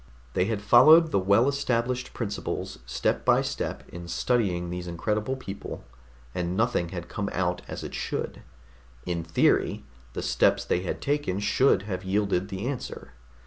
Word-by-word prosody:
They 90 - +2
had 105 -1 -2
followed 155 +9 +7
the 100 - +3
well 100 +6 +4
established 130 -2 0
principles 105 -4 -4
step - - 0
by - - +4
step - - -3
in 85 0 -8
studying 90 -4 0
these 90 0 -5
incredible 105 +8 -1
people, 100 -7 -7 0.5
and 90 0 -2
nothing 115 -7 +1
had 85 -1 -6
come 100 +2 -3
out 90 -1 -1
as - - -6
it - - -7
should. - - -3 0.6
In 85 -2 -2
theory, 80 -3 +2 0.3
the - - -4
steps - - +2
they 90 - +1
had 90 - -4
taken 145 -9 0
should 105 +2 +3
have 100 -3 -4
yielded 100 -1 0
the 95 +2 -4
answer. 130 - -5
100 Hz, 155 wpm, -27 LUFS, 90-120 Hz, 0.6 s, followed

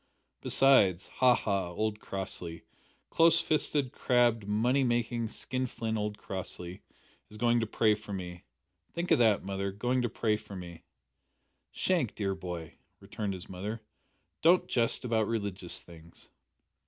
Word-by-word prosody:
Besides 100 -10 +4
ha! 125 -1 +6
ha! 100 -5 -1
old 105 +4 -2
Crossley 90 -4 -5 0.5
close 165 0 +5
fisted, 150 -5 0
crabbed, 120 -4 +2
money 120 +6 +2
making, 120 -1 0
skin 130 +2 -3
flint 115 -2 -3
old 105 -1 -2
Crossley 95 -2 -6 0.5
is 105 - -10
going 120 +1 +3
to 115 - -1
pray 110 0 +3
for 105 0 -7
me. 90 -2 -6 0.5
Think 170 +1 -3
o' - - +8
that, 110 -4 +3
mother 100 0 -2
going 125 +6 0
to 120 - 0
pray 105 -1 0
for 105 -2 -11
me!" 85 -2 -8 0.9
"Shank, 165 - 0
dear 100 -2 -1
boy," 90 -4 -7 0.2
returned 105 -3 -4
his 90 - -9
mother, 105 +5 -5 0.6
"don't 175 +3 +5
jest 120 +1 +1
about 110 -3 +1
religious 100 -5 -3
things." 85 -1 -15
105 Hz, 140 wpm, -30 LUFS, 95-120 Hz, 0.9 s, o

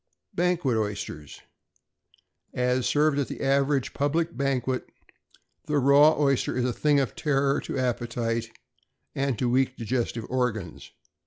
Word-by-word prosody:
=Banquet 175 -8 +1
Oysters.= 100 -8 -5 1.1
As 125 0 +1
served 150 -1 +2
at 140 - -1
the - - -7
average 140 0 +1
public 160 +4 -1
banquet, 130 -2 -1 0.8
the 150 -1 +1
raw 145 +3 +5
oyster 140 -3 +1
is 125 - +1
a 125 - 0
thing 145 +2 +2
of 135 - -2
terror 140 -2 +1
to - - -5
appetite 120 -2 -2 0.6
and 135 -3 -1
to 125 - 0
weak 130 +1 +1
digestive 115 -1 -2
organs. 115 -9 -3
130 Hz, 130 wpm, -26 LUFS, 120-140 Hz, 1.1 s, raw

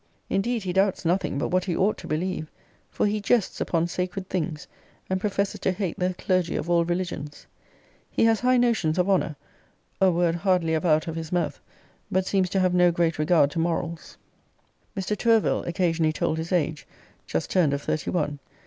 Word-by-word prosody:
Indeed 225 +3 0
he 180 -2 -2
doubts 190 -1 +1
nothing 175 -3 0
but - - -1
what 185 0 +1
he 175 -4 -1
ought 200 +3 +2
to - - -9
believe; 160 0 -2 0.4
for - - 0
he 210 0 0
jests 210 0 +1
upon 165 -1 +1
sacred 180 +2 -3
things; 165 -1 -3 0.4
and 190 0 0
professes 200 -1 -1
to - - +1
hate 185 -2 -3
the 180 0 0
clergy 185 -1 0
of 170 - -2
all 170 -1 +4
religions. 175 -4 -4 0.6
He - - +2
has 225 -1 +3
high 255 0 +3
notions 225 -10 +2
of 180 0 +2
honour, 185 -5 +1 0.7
a 190 - +6
world 170 -1 +1
hardly 180 -3 +1
ever 160 +3 0
out 155 0 +3
of 165 - -4
his 165 -1 -5
mouth; 170 -4 -1 0.5
but 185 0 +1
seems 190 -2 +1
to 190 - 0
have 185 -1 +2
no 180 -1 +5
great 170 -2 0
regard 155 -2 +3
to 165 - -3
morals. 165 -1 -3 0.8
Mr. 195 +2 -1
TOURVILLE 225 0 +2
occasionally 170 -3 +1
told 160 0 -1
his 165 +3 -5
age; 160 -3 0 0.4
just 80 - -2
turned 175 -6 +3
of 140 0 -2
thirty 155 - -2
one. 145 -4 -1
180 Hz, 190 wpm, -25 LUFS, 165-190 Hz, 0.8 s, a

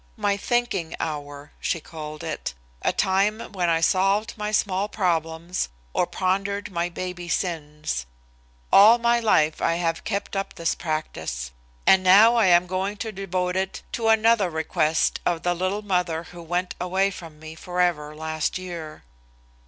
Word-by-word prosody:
My 205 -2 +1
"thinking 220 -6 -1
hour," 145 -2 -5
she 165 - -1
called 155 -1 -8
it, - - -4 0.3
a - - +2
time 200 +4 +1
when 180 -4 0
I 165 0 +2
solved 195 +6 +2
my 210 -1 -3
small 205 -1 +1
problems 170 - -1 0.2
or - - +1
pondered 200 +2 -1
my 170 0 -1
baby 175 0 -6
sins. 150 - -2 0.7
All 215 +4 +9
my 235 0 +2
life 155 -9 +2
I 165 - +2
have 165 -1 -1
kept 200 -1 -3
up 195 0 -3
the 170 - -9
practice. 110 - -3 0.3
And 190 - +6
now 200 +5 +7
I 230 -4 +4
am 175 0 +5
going 190 +3 -2
to 220 +1 -4
devote 185 -2 -2
it 190 0 -2
to 230 -1 -1
another 220 -3 +4
request 160 0 +1
of 170 -2 -1
the 175 - +2
little 185 +4 -2
mother 180 -4 0
who 175 0 -11
went 175 +2 -2
away 190 +2 +1
from 165 -5 -10
me 155 0 -9
forever 170 -3 -1
last 160 +1 -2
year. 170 -4 -7
180 Hz, 155 wpm, -24 LUFS, 160-200 Hz, 0.7 s, All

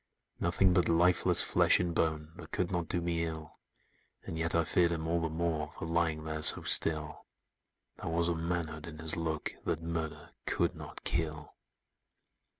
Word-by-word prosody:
"Nothing 90 +1 +2
but 90 -1 +2
lifeless 85 +1 +4
flesh - - +4
and 85 -1 -2
bone, 80 -1 -2
That - - -11
could 90 0 -2
not 85 -2 -2
do 90 - -1
me 85 -1 -2
ill; 80 -1 -6 0.7
And - - -7
yet 80 +1 0
I 85 - +3
feared 85 +2 +1
him 80 -1 -3
all 85 +1 0
the 80 - -2
more, 80 -2 -3
For - - -6
lying 80 -1 -1
there 80 0 -5
so - - +8
still: 75 -2 +2 0.7
There - - -6
was 85 +1 0
a 85 - 0
manhood 80 -1 -4
in 80 -2 -10
his 80 +1 0
look, 80 -2 -3
That 85 - -3
murder 80 -2 -5 0.2
could - - 0
not - - -11
kill! 80 -2 -2
80 Hz, 175 wpm, -31 LUFS, 80-85 Hz, 0.7 s, so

